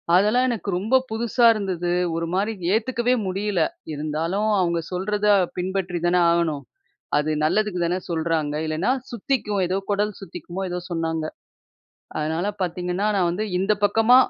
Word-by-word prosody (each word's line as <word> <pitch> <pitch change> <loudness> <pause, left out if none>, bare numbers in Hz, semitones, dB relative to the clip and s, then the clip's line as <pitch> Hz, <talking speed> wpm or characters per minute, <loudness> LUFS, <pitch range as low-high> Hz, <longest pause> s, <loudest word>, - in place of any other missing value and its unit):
அதெல்லாம் 215 +7 +4
எனக்கு 225 -4 -3
ரொம்ப 215 +8 +1
புதுசா 235 +2 +1
இருந்தது. 185 -5 -2 0.2
ஒரு 165 0 -1
மாரி 200 +4 +1 0.2
ஏத்துக்கவே 240 +2 +1
முடியல. 195 0 -1 0.3
இருந்தாலும் 160 +7 -1
அவங்க 170 -2 +1
சொல்றத 205 +3 -1 0.3
பின்பற்றி 180 -1 -2
தான 175 +1 +3
ஆகணும்? 165 -4 +1 0.5
அது 150 +1 +1
நல்லதுக்கு 205 +2 +1
தானே 175 +2 0
சொல்றாங்க. 160 -2 0
இல்லனா 155 +8 0 0.2
சுத்திக்கும். 215 -4 -1
ஏதோ 185 +2 0
கொடல் 205 +1 +1
சுத்திக்குமோ, 175 0 -7
ஏதோ 180 - -2
சொன்னாங்க. 165 -1 -1 0.9
அதனால 160 +4 -1
பாத்தீங்கன்னா, 180 +2 -1
நான் 180 -3 +2
வந்து 200 +5 -2
இந்த 195 +3 +2
பக்கமா 225 +4 +5
185 Hz, 135 wpm, -23 LUFS, 170-210 Hz, 0.9 s, பக்கமா